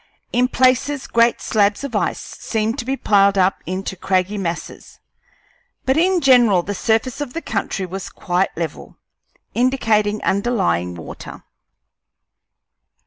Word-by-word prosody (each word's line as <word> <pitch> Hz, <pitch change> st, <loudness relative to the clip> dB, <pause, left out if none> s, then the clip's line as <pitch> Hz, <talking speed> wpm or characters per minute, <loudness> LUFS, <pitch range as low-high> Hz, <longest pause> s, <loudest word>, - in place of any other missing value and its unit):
In 250 Hz, +1 st, +3 dB
places 260 Hz, +2 st, +2 dB
great 230 Hz, 0 st, +2 dB
slabs 205 Hz, +1 st, +1 dB
of 270 Hz, -5 st, -5 dB
ice 205 Hz, -, 0 dB, 0.2 s
seemed 220 Hz, 0 st, -1 dB
to 240 Hz, -, -4 dB
be 265 Hz, +1 st, -1 dB
piled 200 Hz, -3 st, +3 dB
up 185 Hz, 0 st, +2 dB
into 190 Hz, +1 st, -3 dB
craggy 185 Hz, +2 st, 0 dB
masses, 175 Hz, -4 st, -5 dB, 0.9 s
but 265 Hz, -, +2 dB
in 360 Hz, +3 st, +2 dB
general 240 Hz, -, +5 dB
the 205 Hz, -, -4 dB
surface 225 Hz, +6 st, 0 dB
of 270 Hz, -4 st, -5 dB
the 330 Hz, -, -3 dB
country 200 Hz, -2 st, -2 dB
was 185 Hz, +1 st, -6 dB
quite 180 Hz, +1 st, -1 dB
level, 165 Hz, -1 st, -5 dB, 0.6 s
indicating 220 Hz, -5 st, +1 dB
underlying 190 Hz, -, 0 dB
water. 80 Hz, -, -10 dB
215 Hz, 130 wpm, -20 LUFS, 190-250 Hz, 0.9 s, general